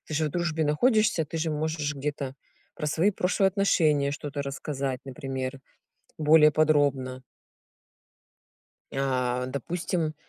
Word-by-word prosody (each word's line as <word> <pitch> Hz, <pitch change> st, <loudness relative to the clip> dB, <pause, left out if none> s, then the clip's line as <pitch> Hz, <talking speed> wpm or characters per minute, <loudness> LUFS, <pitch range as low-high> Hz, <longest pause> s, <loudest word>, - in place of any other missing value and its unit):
ты 155 Hz, -, -4 dB
же 155 Hz, +1 st, +1 dB
в -, -, 0 dB
дружбе 165 Hz, -2 st, -1 dB
находишься, 215 Hz, -, +3 dB
ты 165 Hz, -, -7 dB
же 160 Hz, 0 st, -1 dB
можешь 150 Hz, -1 st, -2 dB
где-то 140 Hz, -1 st, -4 dB, 0.4 s
про 150 Hz, -, -4 dB
свои 165 Hz, +7 st, +2 dB
прошлые 190 Hz, 0 st, +2 dB
отношения 160 Hz, -7 st, +2 dB
что-то 145 Hz, -1 st, -4 dB
рассказать, 140 Hz, -1 st, -4 dB
например, 135 Hz, -1 st, -5 dB, 0.6 s
более 150 Hz, 0 st, +6 dB
подробно. 145 Hz, -4 st, +1 dB, 1.7 s
А 125 Hz, -2 st, 0 dB
допустим, 160 Hz, +3 st, -2 dB
150 Hz, 115 wpm, -27 LUFS, 135-160 Hz, 1.7 s, более